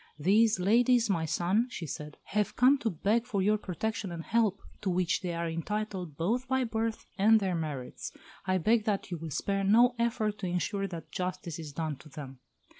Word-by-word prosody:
"These 210 +6 +4
ladies, 230 +3 +4
my 165 -4 0
son," 185 +9 +1
she 175 - -5
said, 150 0 -7
"have 210 0 -1
come 265 +3 +5
to 230 - 0
beg 220 +7 0
for 205 -5 -1
your 210 +2 +3
protection 205 +1 -3
and 165 -1 -5
help, 220 -3 +1 0.2
to 195 - -1
which 180 -1 +1
they 180 -2 -2
are 170 0 -2
entitled 180 -1 -3
both 235 +10 0
by 260 0 +2
birth 225 -1 -2
and 220 +2 +6
their 190 -3 -1
merits. 150 -6 -4 0.4
I 185 0 +3
beg 215 +5 +2
that 200 -3 -1
you 175 - -3
will 165 0 -6
spare 195 +7 -1
no 235 +5 +5
effort 220 -3 0
to 185 - -3
ensure 195 +3 -1
that 170 -3 -8
justice 180 -3 -4
is 155 -3 -7
done 155 -1 -3
to 150 - -15
them." 135 -3 -9
195 Hz, 195 wpm, -30 LUFS, 170-220 Hz, 0.4 s, and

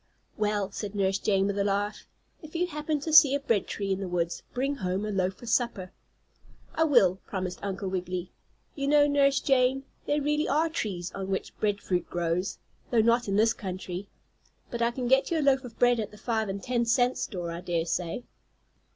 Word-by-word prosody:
"Well," 210 -2 0
said 205 0 -5
Nurse 195 -1 +1
Jane 195 -2 +2
with 200 0 -1
a - - +3
laugh, 205 +1 -1 0.3
"if 310 +1 -12
you 350 +2 +2
happen 300 -2 -2
to 315 +2 -3
see 290 -3 +8
a - - 0
bread 230 -7 0
tree 200 -1 -3
in 190 - 0
the 195 - -3
woods, 170 -1 -1
bring 275 +3 -1
home 190 0 -2
a 210 - -2
loaf 190 -1 0
for 240 - -12
supper." 230 -5 0 0.8
"I 320 - +2
will," 200 - +4
promised 185 -2 -4
Uncle 195 0 -3
Wiggily. 180 -1 -3 0.4
"You 275 -1 -3
know, 290 0 +5
Nurse 280 -1 +3
Jane, 265 0 +2 0.2
there 295 +1 +2
really 300 +1 0
are 315 +3 +2
trees 190 - -3
on 195 -1 -5
which 190 - -3
bread 205 -1 +1
fruit 180 -1 -1
grows, 175 +2 -1 0.3
though 235 -2 +4
not 235 +1 +3
in 195 - 0
this 225 +2 +4
country. 185 -2 -6 0.6
But 235 - -3
I 235 - +3
can 245 +1 -3
get 265 +2 +4
you 335 - +1
a - - 0
loaf 270 -1 +4
of 245 -3 -10
bread 245 -1 +4
at 215 - -2
the 210 - -14
five 220 -1 -1
and 195 0 -4
ten 245 -1 0
cent 245 +1 +2
store, 175 -5 -4
I 170 +1 -5
dare 170 -2 -1
say." 170 +6 -2
210 Hz, 210 wpm, -28 LUFS, 190-265 Hz, 0.8 s, see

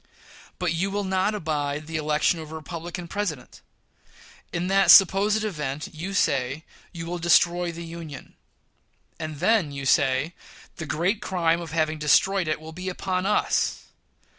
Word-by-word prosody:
But 180 -3 -1
you 180 +4 -1
will 205 +1 -2
not 190 +2 0
abide 150 -4 -2
the 160 0 -4
election 155 +2 +1
of 155 -1 -9
a - - -6
Republican 170 +2 -7
President! 170 -9 -4 0.9
In 175 +1 -2
that 195 +1 +3
supposed 205 +3 +6
event, 150 -8 -4
you 180 +6 -5
say, 140 -2 0 0.3
you 165 -2 -7
will 175 +1 -4
destroy 175 +1 +3
the 170 0 -8
Union; 165 -4 -9 0.9
and 155 -2 -5
then, 180 -2 +2
you 140 -1 -6
say, 135 +3 +2 0.4
the 160 - -6
great 180 +9 0
crime 170 -2 +1
of 170 - -7
having 155 -1 0
destroyed 185 +4 +3
it 155 - -1
will 160 +1 -10
be 180 +3 -5
upon 185 0 -2
us! 210 - +1
170 Hz, 155 wpm, -25 LUFS, 155-185 Hz, 0.9 s, supposed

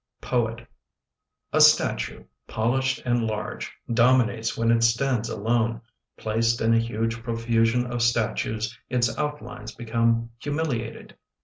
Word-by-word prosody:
Poet 115 -2 -1 0.9
A - - +4
statue, 60 +1 +3 0.2
polished 130 +4 0
and 120 -2 +1
large, 105 -1 -4 0.2
Dominates 120 -1 +3
when 115 0 +2
it 115 0 +3
stands 115 0 +1
alone. 115 +1 0 0.4
Placed 115 +2 0
in 115 +1 +3
a 115 - +4
huge 115 0 -2
profusion 115 +1 +1
of 120 -1 -3
statues 110 -1 0
Its 120 -3 +1
outlines 125 -7 -5
become 115 0 0
humiliated. 145 -6 -3
115 Hz, 115 wpm, -25 LUFS, 115-120 Hz, 0.9 s, A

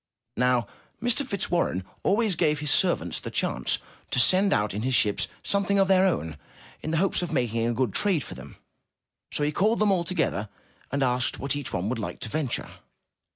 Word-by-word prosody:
Now, 125 -2 +2 0.3
Mr. 245 +4 +2
Fitzwarren 175 - -1 0.2
always 210 0 +2
gave 155 -3 +2
his 145 0 -1
servants 90 - +1
the - - -6
chance - - -1 0.3
to - - -2
send 185 - +4
out 105 - +1
in 105 - -3
his 130 +2 +1
ships 105 -4 +2 0.2
something 200 0 +1
of 195 -1 +4
their 190 0 +5
own, 80 - -2 0.4
in - - -4
the 165 - 0
hopes 190 +2 +1
of 175 - -3
making 115 -2 0
a 120 - 0
good 125 -5 0
trade 185 -9 +3
for - - -7
them, - - -11 0.8
so 145 - -1
he 145 - +1
called 215 +8 +2
them 210 -1 +3
all 180 -3 +2
together, 110 - -1 0.4
and 140 0 +1
asked 125 +1 0
what 140 0 -2
each 145 -2 -5
would 105 +7 -2
like 110 - -5
to - - -4
venture. 140 -2 -2
150 Hz, 195 wpm, -26 LUFS, 120-190 Hz, 0.8 s, their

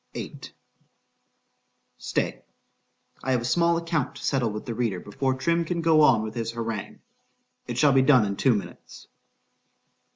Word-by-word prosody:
VIII - - -7 1.6
STAY—I 60 - -6
have 125 - +1
a - - -5
small 170 +5 +2
account 165 -4 -2
to - - -10
settle 130 -5 +1
with 105 0 -6
the 120 - -4
reader 110 -6 -1
before 130 +7 -2
Trim 170 +6 +1
can 170 +1 -3
go 165 -2 +4
on 120 -7 +5
with 110 0 -5
his 115 0 -4
harangue.—It 115 +1 -8
shall 140 +1 +4
be 135 - +5
done 130 -5 +5
in 100 -1 -3
two 125 +3 +3
minutes. 100 - -8
125 Hz, 150 wpm, -25 LUFS, 110-155 Hz, 1.6 s, on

